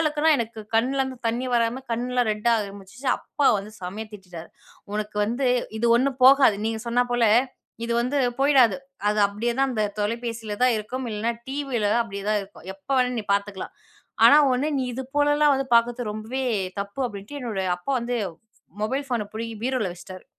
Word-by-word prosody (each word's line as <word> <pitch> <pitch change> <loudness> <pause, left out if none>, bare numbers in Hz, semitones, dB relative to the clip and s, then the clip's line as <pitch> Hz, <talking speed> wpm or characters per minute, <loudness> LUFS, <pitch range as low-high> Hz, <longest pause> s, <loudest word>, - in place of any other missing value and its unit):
அளவுக்குனா, 310 0 +2
எனக்கு 230 -1 -4
கண்லேருந்து 260 +2 +1
தண்ணி 235 +3 -1
வராம, 235 +2 +1
கண்ணுலாம் 245 0 0
ரெட்டாக 225 +2 +2
ஆரம்பிச்சுச்சு. 200 +6 -11
அப்பா 285 - -1
வந்து 200 +2 -8
செமையா 200 +5 -5
திட்டிட்டாரு. 180 -5 -10 0.4
"உனக்கு 210 0 -4
வந்து 240 +5 -1 0.3
இது 235 - +1
ஒண்ணும் 265 +1 0
போகாது. 265 -6 +7
"நீங்க 225 -1 -2
சொன்னாப் 245 +1 +1
போல, 240 -1 +2 0.6
"இது 235 - -1
வந்து 255 +4 0 0.2
போயிடாது. 270 -5 +5 0.3
அது 210 - +1
அப்டியே 230 +4 -2
தான், 270 - +3
அந்த 215 -2 0 0.2
தொலைபேசியில 225 -1 -3
தான் 250 -2 +4
இருக்கும் 245 +4 -4
இல்லைனா, 220 +3 -1 0.2
டிவியில 270 -5 -2
தான், 235 - +3
அப்டியே 200 -2 -7
தான் 210 - +2
இருக்கும். 195 -3 -15
எப்போ 195 +8 -6
வேணாலும் 250 -2 +1
நீ 210 - -10
பார்த்துக்கலாம், 200 -1 -4 0.5
ஆனா 290 - +8 0.2
ஒண்ணு, 280 +5 0
நீ 260 - 0
இது 265 +2 -4
போலலாம் 290 0 +4
வந்து 270 0 -3
பார்க்கறது 235 -1 +2
ரொம்பவே 225 +5 -4 0.4
தப்பு" 200 +6 -6
அப்டின்ட்டு 205 +7 -8
என்னோட 215 -5 -2 0.2
அப்பா 225 +10 -3
வந்து, 240 0 -2 0.6
மொபைல் 265 +6 -1
ஃபோன 240 -4 0
பிடுங்கி 225 0 -5
பீரோவில 250 -8 -1
வச்சுட்டாரு. 185 +1 -11
235 Hz, 170 wpm, -24 LUFS, 210-260 Hz, 0.6 s, ஆனா